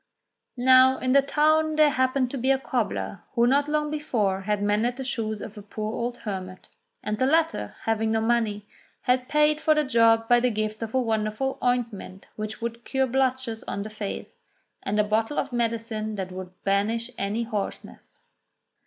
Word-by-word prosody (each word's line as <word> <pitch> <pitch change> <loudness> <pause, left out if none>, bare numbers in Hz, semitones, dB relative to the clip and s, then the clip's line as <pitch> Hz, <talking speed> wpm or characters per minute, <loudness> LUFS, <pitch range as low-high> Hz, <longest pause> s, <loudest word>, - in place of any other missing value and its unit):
Now 260 +1 +6
in 255 - -1
the 280 +1 +6
town 310 +2 +2
there 305 -1 +5
happened 260 -1 +1
to 275 - -3
be 260 +3 0
a 270 - +5
cobbler 235 -7 -2
who 235 - +4
not 280 +3 +3
long 300 0 0
before 220 -11 -1
had 205 +1 -1
mended 215 +4 +1
the 265 - -5
shoes 220 -4 -2
of 210 0 -8
a - - -9
poor 215 +1 -5
old 240 0 -3
hermit; 185 -4 -6 0.3
and 210 0 -2
the 260 - +3
latter, 315 - +1
having 225 0 0
no 225 - +2
money, 220 -3 0 0.3
had 255 0 +1
paid 300 0 +3
for 310 - +4
the 305 - +2
job 230 -3 +4
by 240 0 +5
the 250 +1 +2
gift 215 -1 -3
of 225 +2 -4
a - - +4
wonderful 220 +2 -1
ointment 235 -6 -2
which 215 +1 -6
would 235 0 -4
cure 265 +1 0
blotches 260 -3 -1
on 200 - -3
the 215 - -8
face, 215 -2 -6 0.4
and 210 +2 -1
a - - +5
bottle 220 +6 0
of 275 - -2
medicine 225 -2 -2
that 190 -2 -4
would 185 0 -7
banish 220 +5 0
any 205 +4 -1
hoarseness. 215 -4 -6
230 Hz, 185 wpm, -25 LUFS, 215-260 Hz, 0.4 s, Now